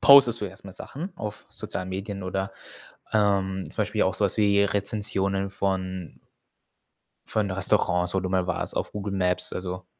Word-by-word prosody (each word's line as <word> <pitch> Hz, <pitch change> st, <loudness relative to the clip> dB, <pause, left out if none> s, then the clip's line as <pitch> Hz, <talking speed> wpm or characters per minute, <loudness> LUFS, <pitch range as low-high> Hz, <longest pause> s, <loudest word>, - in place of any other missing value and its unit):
postest 130 Hz, -4 st, +8 dB
du -, -, -1 dB
erst 95 Hz, +2 st, -10 dB
mal 95 Hz, -, -9 dB
Sachen 165 Hz, -, -6 dB
auf 105 Hz, -1 st, -6 dB
sozialen 95 Hz, +1 st, -5 dB
Medien 100 Hz, +1 st, -4 dB
oder, 95 Hz, +1 st, -2 dB, 0.6 s
ähm, 95 Hz, -3 st, +2 dB
zum -, -, +1 dB
Beispiel -, -, 0 dB
auch -, -, +2 dB
so -, -, +2 dB
was -, -, +3 dB
wie 100 Hz, -1 st, +4 dB
Rezensionen 100 Hz, -1 st, 0 dB
von 95 Hz, -2 st, -3 dB, 1.1 s
von 105 Hz, -2 st, 0 dB
Restaurants, 90 Hz, -1 st, +2 dB
wo 95 Hz, -, +2 dB
du 95 Hz, -, -2 dB
mal 95 Hz, -1 st, +1 dB
warst 90 Hz, -, -2 dB
auf -, -, -2 dB
Google 100 Hz, -1 st, -3 dB
Maps? 90 Hz, -1 st, +1 dB
Also, 90 Hz, 0 st, -5 dB
95 Hz, 170 wpm, -26 LUFS, 95-100 Hz, 1.1 s, postest